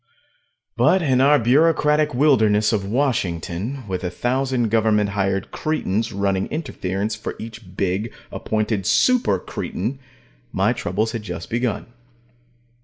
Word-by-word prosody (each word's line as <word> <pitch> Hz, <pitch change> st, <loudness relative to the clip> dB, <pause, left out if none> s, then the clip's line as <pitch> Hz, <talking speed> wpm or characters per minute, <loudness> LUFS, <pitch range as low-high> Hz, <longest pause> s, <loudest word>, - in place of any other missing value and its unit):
But 190 Hz, -2 st, +4 dB
in 130 Hz, -4 st, +3 dB
our 145 Hz, +2 st, +6 dB
bureaucratic 150 Hz, +4 st, +3 dB
wilderness 110 Hz, -7 st, +3 dB
of 105 Hz, -3 st, 0 dB
Washington, 110 Hz, -, -2 dB
with 95 Hz, -1 st, -3 dB
a 90 Hz, -, -1 dB
thousand 125 Hz, +3 st, 0 dB
government 105 Hz, -2 st, +2 dB
hired 95 Hz, -1 st, -1 dB
cretins 115 Hz, -7 st, -1 dB
running 100 Hz, -1 st, 0 dB
interference 105 Hz, -, -3 dB
for 105 Hz, -, -6 dB
each 110 Hz, -4 st, -10 dB
big, 100 Hz, +4 st, -1 dB, 0.2 s
appointed 110 Hz, -3 st, -1 dB
super 250 Hz, -, +3 dB
cretin, 115 Hz, +7 st, -4 dB, 0.5 s
my 100 Hz, +5 st, +2 dB
troubles 110 Hz, -1 st, -1 dB
had 115 Hz, -, -4 dB
just 90 Hz, -5 st, -7 dB
begun. 120 Hz, -1 st, -1 dB
110 Hz, 120 wpm, -22 LUFS, 100-130 Hz, 0.5 s, our